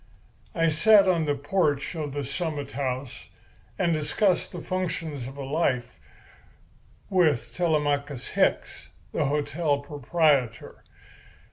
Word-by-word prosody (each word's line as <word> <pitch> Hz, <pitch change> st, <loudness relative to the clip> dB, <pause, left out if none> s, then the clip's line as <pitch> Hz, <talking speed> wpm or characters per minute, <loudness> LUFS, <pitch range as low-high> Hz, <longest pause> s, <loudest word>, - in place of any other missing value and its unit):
I 165 Hz, -1 st, +3 dB
sat 200 Hz, +6 st, +5 dB
on 170 Hz, -4 st, +2 dB
the 145 Hz, -1 st, +1 dB
porch 145 Hz, 0 st, 0 dB
of 155 Hz, -4 st, -4 dB
the 145 Hz, 0 st, -3 dB
Summit 145 Hz, 0 st, -4 dB
House 130 Hz, -1 st, -4 dB, 0.5 s
and 170 Hz, -2 st, +2 dB
discussed 175 Hz, +5 st, +1 dB
the 175 Hz, -, -7 dB
functions 165 Hz, -7 st, -3 dB
of 135 Hz, +2 st, -10 dB
life 135 Hz, -, -1 dB, 1.1 s
with 145 Hz, -, +2 dB
Telemachus 145 Hz, -5 st, 0 dB
Hicks, -, -, 0 dB, 0.2 s
the -, -, 0 dB
hotel 145 Hz, +1 st, 0 dB
proprietor. 145 Hz, -3 st, 0 dB
150 Hz, 110 wpm, -26 LUFS, 140-170 Hz, 1.1 s, sat